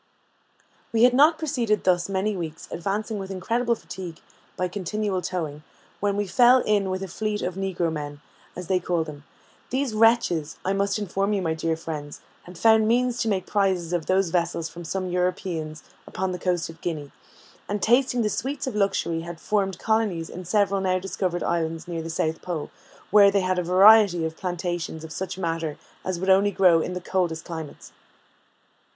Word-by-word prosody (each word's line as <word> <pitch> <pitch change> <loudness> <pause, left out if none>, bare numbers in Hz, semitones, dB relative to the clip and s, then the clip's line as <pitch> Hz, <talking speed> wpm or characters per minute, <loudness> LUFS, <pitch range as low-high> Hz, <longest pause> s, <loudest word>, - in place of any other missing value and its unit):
We 230 0 +3
had 250 0 +6
not 300 +5 +5
proceeded 240 - 0
thus 175 0 +2
many 195 +2 0
weeks, 165 -3 -6
advancing 210 +4 -2
with 190 -1 -6
incredible 235 +6 0
fatigue 180 -6 -8 0.4
by 180 - 0
continual 200 +1 -2
towing, 160 -5 -4 0.4
when 200 0 0
we 205 - 0
fell 245 +5 +5
in 205 -3 +1
with 185 +1 -2
a - - -4
fleet 210 +3 -3
of 180 - -2
Negro 180 -3 -1
men, 145 -1 -5 0.4
as 180 - -6
they 185 +2 +1
call 175 -2 0
them. 150 -2 -10 0.4
These 260 -2 -1
wretches, 215 -9 +3
I 190 - +1
must 200 +1 0
inform 200 0 -1
you, 195 -2 0
my 160 -2 0
dear 160 0 -1
friends, 150 -3 -6 0.3
had 180 0 -11
found 220 +2 +5
means 245 +1 +2
to - - 0
make 195 -4 0
prizes 190 -4 0
of 170 -3 -1
those 185 -2 +2
vessels 170 -2 0
from 175 +1 -9
some 185 +2 -3
Europeans 180 -4 -2 0.2
upon 190 0 -2
the 180 - -4
coast 175 -2 0
of 165 0 -12
Guinea, 150 -5 -4 0.6
and 205 +1 -1
tasting 245 +2 +3
the 210 - +1
sweets 275 +3 -3
of 260 - -3
luxury, 195 -5 0
had 170 0 -8
formed 195 -2 0
colonies 210 -7 0
in 180 +1 -8
several 200 +1 +2
new 185 -1 +1
discovered 185 -2 -2
islands 165 -1 -1
near 170 -2 -3
the 165 - -6
South 160 -1 -1
Pole, 170 -5 -4 0.4
where 200 0 +8
they 200 0 +2
had 185 0 0
a - - -1
variety 185 -1 +6
of 160 0 -4
plantations 175 -3 -3
of 160 - -9
such 185 +2 -4
matters 165 -4 -2 0.3
as 185 -2 -3
would 190 +1 +2
only 195 +2 +5
grow 180 -4 +4
in 180 - -3
the 180 - -4
coldest 175 -3 -1
climates. 160 -4 -8
185 Hz, 185 wpm, -25 LUFS, 170-205 Hz, 0.6 s, where